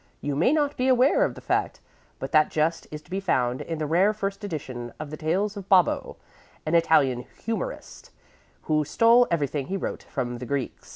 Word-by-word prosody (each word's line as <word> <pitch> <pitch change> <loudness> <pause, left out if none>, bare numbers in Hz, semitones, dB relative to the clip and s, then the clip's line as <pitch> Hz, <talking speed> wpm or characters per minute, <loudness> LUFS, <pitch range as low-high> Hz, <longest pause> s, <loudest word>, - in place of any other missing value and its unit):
You 145 -1 -3
may 170 - +3
not 290 -2 +1
be 255 - +1
aware 260 - +4
of - - -1
the - - -11
fact, - - -1 0.4
but - - -6
that 155 -1 +4
jest 160 +2 -1
is 150 0 -8
to 180 - -23
be 190 - -1
found 125 -10 0
in 165 - -4
the 155 - -2
rare 180 +7 +3
first 200 -1 -4
edition 130 -10 -5
of 150 -1 -6
the - - -4
Tales 195 +7 -1
of 195 -1 -9
Bobbo, 185 -3 +3 0.5
an 155 - -2
Italian 140 -7 +3 0.2
humorist, 365 - -5 0.5
who 155 -1 +1
stole 230 - +4
everything 145 -4 -1
he 195 - -2
wrote - - -4
from 120 -3 -4
the 125 - -7
Greeks." 140 -1 -4
165 Hz, 195 wpm, -25 LUFS, 145-205 Hz, 0.5 s, aware